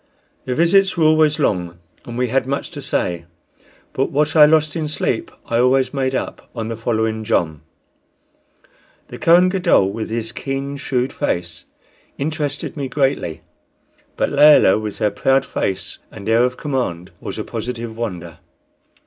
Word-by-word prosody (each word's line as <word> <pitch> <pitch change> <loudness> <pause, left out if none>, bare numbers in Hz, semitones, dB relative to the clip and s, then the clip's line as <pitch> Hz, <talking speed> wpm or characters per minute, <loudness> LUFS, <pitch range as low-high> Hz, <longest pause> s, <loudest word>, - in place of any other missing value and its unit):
Their 125 - -2
visits 185 +4 +3
were 165 - +2
always 155 -1 +4
long, 90 - -1 0.3
and 120 0 -7
we 125 -1 0
had 130 +1 0
much 140 +1 -3
to - - -7
say; 85 -1 -2 0.7
but 135 - 0
what 150 +2 0
I 150 -1 +8
lost 155 -1 +2
of 155 -2 -2
sleep 150 - -1 0.2
I 115 - 0
always 130 +1 +3
made 135 -1 -1
up - - -5
on 115 -1 -4
the 115 - -3
following 110 -1 -1
jom. 80 -8 0 1.5
The - - -9
Kohen 175 +2 +5
Gadol, 175 - +2
with 110 +2 -5
his 115 0 -3
keen, 135 +3 -4
shrewd 130 -1 -1
face, 85 - -3 0.5
interested 145 -1 -3
me 140 -3 -3
greatly; 135 - -1 0.8
but - - 0
Layelah, 145 -9 +6
with 105 -1 -5
her 105 - +1
proud 135 0 +2
face 95 -2 -3
and 105 -2 -10
air 115 +2 +4
of 125 0 -3
command, 120 - -3
was - - -6
a - - -3
positive 115 -2 -5
wonder. 90 -8 -5
125 Hz, 155 wpm, -19 LUFS, 110-145 Hz, 1.5 s, I